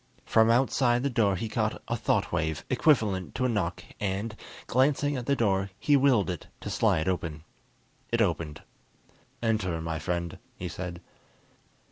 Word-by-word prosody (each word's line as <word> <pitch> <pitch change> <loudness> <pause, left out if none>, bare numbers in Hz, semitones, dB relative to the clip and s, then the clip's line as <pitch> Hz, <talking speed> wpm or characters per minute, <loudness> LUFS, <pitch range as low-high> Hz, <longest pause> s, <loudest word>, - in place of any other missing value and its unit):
From 110 0 +4
outside 125 0 +3
the 140 - 0
door 105 -5 +2
he 105 +5 -3
caught - - -1
a - - 0
thought - - 0
wave 80 -1 -1
equivalent 110 - +2
to 130 - 0
a - - +2
knock, 95 -7 -1 0.2
and, 100 +2 -2 0.3
glancing 145 +3 +2
at 125 -2 -4
the 140 - +3
door, 100 -5 +1
he 145 +6 +3
willed 130 -9 +4
it 90 - -7
to - - -5
slide 80 - +2
open. 80 -4 -2 0.7
It 115 - +1
opened. 85 -7 0 0.8
"Enter, 105 -7 0
my 80 -1 -3
friend," 85 -1 -3 0.2
he 90 - -5
said. 90 -1 -6
100 Hz, 155 wpm, -28 LUFS, 85-120 Hz, 0.8 s, From